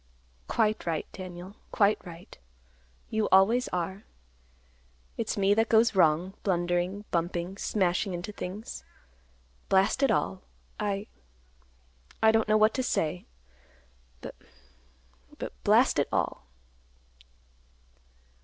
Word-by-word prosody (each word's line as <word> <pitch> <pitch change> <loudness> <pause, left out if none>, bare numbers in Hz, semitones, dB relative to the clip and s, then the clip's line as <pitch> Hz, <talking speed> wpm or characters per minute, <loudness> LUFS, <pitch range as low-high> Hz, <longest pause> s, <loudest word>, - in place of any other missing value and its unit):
"Quite 215 -4 0
right, 160 -2 -1
Daniel; 185 +1 -9
quite 205 0 +2
right. 175 -1 -11 0.8
You 220 -1 0
always 215 +7 +5
are. 185 +3 -4 1.1
It's - - -3
me 200 0 +3
that 225 +1 +1
goes 225 +1 +4
wrong; 175 0 +3
blundering, 175 +2 -1
bumping, 175 +2 -2
smashing 190 0 0
into 175 +4 -5
things. 205 +2 -7 0.9
Blast 195 +7 +3
it 275 - +4
all! 190 - 0 0.4
I—I 65 - -4
don't 220 0 +2
know 215 0 +4
what 215 +1 +4
to 260 - -1
say. 175 -8 -1 1.0
B—B—Blast - - -3
it - - +1
all!" - - -2
185 Hz, 100 wpm, -28 LUFS, 155-210 Hz, 1.1 s, always